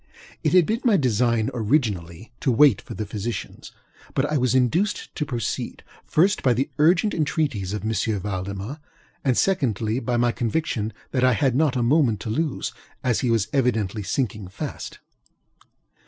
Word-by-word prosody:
It - - +1
had 180 -3 +6
been 225 +7 -1
my 230 -6 +4
design, 115 - +1
originally, 110 - -1
to 135 - +1
wait 130 -2 +5
for - - -9
the 110 - -3
physicians; 105 +2 -5 0.4
but 135 - +2
I 150 - -1
was 130 -3 +2
induced 165 - +1
to 150 - -3
proceed, 120 -6 -3 0.2
first, 190 +6 +2
by 125 -3 +3
the 135 +4 -1
urgent 170 +7 +4
entreaties 145 - -1
of 105 -1 -4
M. 110 +1 -1 0.3
Valdemar, 100 - -4 0.4
and 130 -3 +2
secondly, 120 - +1
by 120 -1 -1
my 120 0 +3
conviction 115 -3 -1 0.2
that 130 - 0
I 130 0 +5
had 130 +2 +2
not 150 -2 +2
a 125 - +1
moment 120 -4 +3
to 110 - -4
lose, 150 +4 -2 0.3
as 125 -3 +1
he 125 - 0
was 115 -3 +2
evidently 110 -6 +1
sinking 105 -2 -2
fast. 95 - -6
125 Hz, 165 wpm, -24 LUFS, 110-145 Hz, 0.4 s, had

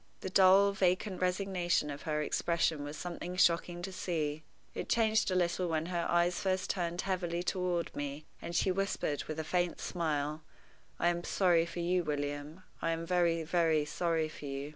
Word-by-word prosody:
The 190 - -4
dull, 195 +2 +6
vacant 185 0 0
resignation 180 -4 0
of 145 - -7
her 150 0 +1
expression 165 -1 0
was 145 +1 -6
something 175 +1 -5
shocking 175 0 +2
to 190 - -4
see. 155 -5 -2 0.3
It - - -5
changed 220 -2 +3
a 185 - 0
little 180 0 +1
when 160 -1 0
her 175 -1 -1
eyes 175 +1 +2
first 190 -1 0
turned 175 -1 -2
heavily 175 -2 -2
toward 180 -2 -1
me, 145 +1 -4 0.2
and 170 - -5
she 185 - +3
whispered, 185 -6 -1
with 155 - -5
a - - -1
faint 175 +1 0
smile, 155 -3 -2 0.6
"I 175 - +3
am 175 0 -2
sorry 175 -4 +3
for 170 +1 -5
you, 180 +1 +1
William 145 +2 -4 0.2
I - - 0
am 165 0 -4
very, 170 -2 +2
very 160 -2 +2
sorry 165 0 0
for 155 -1 -10
you." 140 +1 -4
175 Hz, 180 wpm, -32 LUFS, 155-180 Hz, 0.6 s, dull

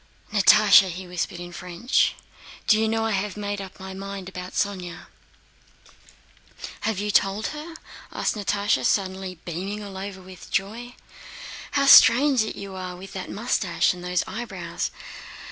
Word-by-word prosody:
"Natásha!" 205 -1 +7
he 180 +2 -6
whispered 175 0 -4
in 175 0 -8
French, 180 +7 0 0.5
"do 215 - +4
you 220 - +2
know 225 0 0
I 225 - 0
have 200 0 -2
made 205 -1 -3
up 190 0 -10
my 190 0 -7
mind 195 -1 -7
about 180 -1 -8
Sónya?" 185 -4 -3 1.7
"Have 220 -3 -1
you 205 +1 -1
told 200 +2 +2
her?" 310 +2 -8 0.4
asked - - -1
Natásha, 205 -1 0
suddenly 190 -2 -1
beaming 195 +5 -4
all 195 -2 -8
over 195 0 -6
with 185 -1 -13
joy. 230 +5 -3
"Oh, - - -25 0.7
how 280 -1 +2
strange 275 -1 +7
you 200 -2 -5
are 185 -1 -6
with 190 +2 -11
that 190 - -6
mustache 210 -7 0
and 180 0 -10
those 180 0 0
eyebrows!... 190 -5 -4
195 Hz, 150 wpm, -24 LUFS, 185-215 Hz, 1.7 s, Natásha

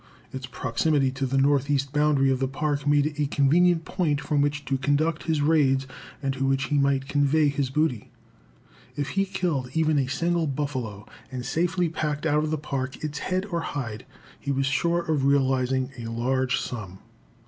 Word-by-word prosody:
Its 130 -1 -5
proximity 130 +3 0
to 135 0 -2
the 135 +2 0
northeast 140 0 +2
boundary 150 -2 +3
of 130 - 0
the 135 - +1
Park 145 +1 -2
made 145 0 +4
it 150 0 -4
a 145 - +1
convenient 165 +5 +3
point 155 -6 0
from 145 -1 0
which 145 0 -1
to 135 -1 -1
conduct 150 +4 0
his 160 -3 +1
raids 140 -4 +3 0.4
and 135 0 0
to 135 0 -3
which 135 0 +1
he 145 -2 +2
might 140 -1 +1
convey 145 +1 +3
his 140 -2 -1
booty. 135 -6 0 0.9
If 145 0 -2
he 195 0 +1
killed 170 -9 -1
even 155 -2 +3
a 135 - 0
single 170 +3 0
buffalo, 130 -7 -3 0.3
and 125 -1 -5
safely 175 +1 0
packed 155 -2 -3
out 150 -1 +2
of 155 - -1
the 155 - 0
Park 135 -2 -4
its 150 -1 -3
head 185 +1 -1
or 170 -1 0
hide, 120 -9 -5 0.3
he 140 - -3
was 135 0 +1
sure 170 +6 +1
of 155 -5 0
realizing 130 -1 +2
a 115 - -5
large 125 +3 0
sum. 100 -6 -6
140 Hz, 185 wpm, -25 LUFS, 135-155 Hz, 0.9 s, made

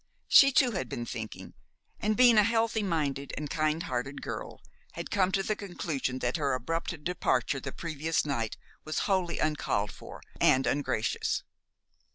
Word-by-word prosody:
She 275 0 +8
too 260 -1 +4
had 180 - -3
been 120 - -4
thinking, 110 -3 -7 0.5
and, 215 +1 0
being 240 -3 +7
a - - +6
healthy 225 0 +1
minded 145 -7 -2
and 150 0 -4
kind 155 +1 0
hearted 130 +3 -4
girl, - - -6 0.3
had - - -6
come 190 -2 +2
to 195 - +2
the 215 - 0
conclusion 160 -10 -3
that 125 +2 -1
her 140 -4 +1
abrupt 165 +4 -3
departure 140 -6 0
the - - -5
previous 160 -1 -2
night 115 -7 -2 0.3
was 155 - -4
wholly 185 -4 +1
uncalled 125 -9 0
for - - -11 0.2
and 130 +1 +4
ungracious. 110 -7 0
155 Hz, 160 wpm, -29 LUFS, 130-190 Hz, 0.5 s, She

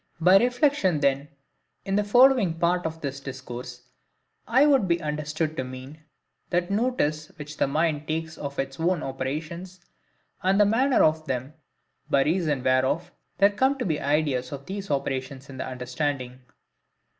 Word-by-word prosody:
By 180 +3 +6
reflection 245 - +2
then, 140 0 +1 0.6
in 195 - -1
the 210 - +2
following 235 -5 +4
part 175 0 +1
of 160 0 -8
this 140 -1 -4
discourse, 125 -2 -8 0.6
I 260 +5 +5
would 270 -9 +4
be 170 -1 +2
understood 155 0 -3
to - - -1
mean, 130 +4 -9 0.5
that 175 +1 0
notice 200 -10 0
which 150 -2 -9
the - - +2
mind 155 +1 0
takes 160 0 -3
of 140 -1 -6
its 135 +1 -3
own 170 0 +1
operations, 155 +8 -5 0.6
and 190 +2 +2
the 205 - +6
manner 250 +6 +3
of 155 0 +2
them, 130 +3 -3 0.6
by 140 -3 +4
reason 155 -5 0
whereof 130 +6 +1 0.3
there 200 +2 +5
come 265 +7 +1
to 250 - -3
be 155 -5 -1
ideas 145 -3 0
of 140 -1 -7
these 195 +2 -6
operations 135 -1 -3
in 130 - -10
the - - -4
understanding. 130 0 -3
155 Hz, 155 wpm, -25 LUFS, 135-185 Hz, 0.6 s, By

